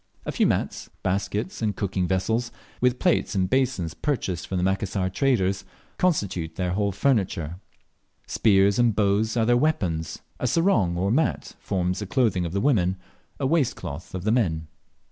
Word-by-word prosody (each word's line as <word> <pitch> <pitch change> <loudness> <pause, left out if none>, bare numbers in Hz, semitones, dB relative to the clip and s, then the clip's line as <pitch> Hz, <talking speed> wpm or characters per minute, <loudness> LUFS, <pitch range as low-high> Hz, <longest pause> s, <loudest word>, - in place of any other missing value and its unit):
A - - -2
few - - +2
mats, - - -2
baskets, 100 - -2
and 105 -3 0
cooking 95 -2 -1
vessels, 110 +6 0 0.3
with 125 0 +3
plates 175 - +1
and 95 -1 +2
basins 100 -9 0
purchased 95 - -2
from 95 - -2
the 90 - 0
Macassar 95 0 0
traders, 100 -6 +1 0.4
constitute 95 - 0
their 90 -1 -1
whole 100 +2 0
furniture; 95 - 0 0.7
spears 100 0 +3
and 120 -3 +3
bows 105 +2 +1
are 115 - +3
their 120 +1 +4
weapons; 90 - -1 0.2
a 125 - 0
sarong 120 - +2
or 95 +3 +1
mat 155 +7 0
forms 90 -1 -1
the 105 - -4
clothing 100 -7 +1
of - - -6
the 100 +2 -1
women, 95 -10 +2 0.4
a 140 - -1
waistcloth 115 - -1
of 90 - -4
the 110 - +1
men. 85 -10 +1
100 Hz, 165 wpm, -25 LUFS, 90-120 Hz, 0.7 s, their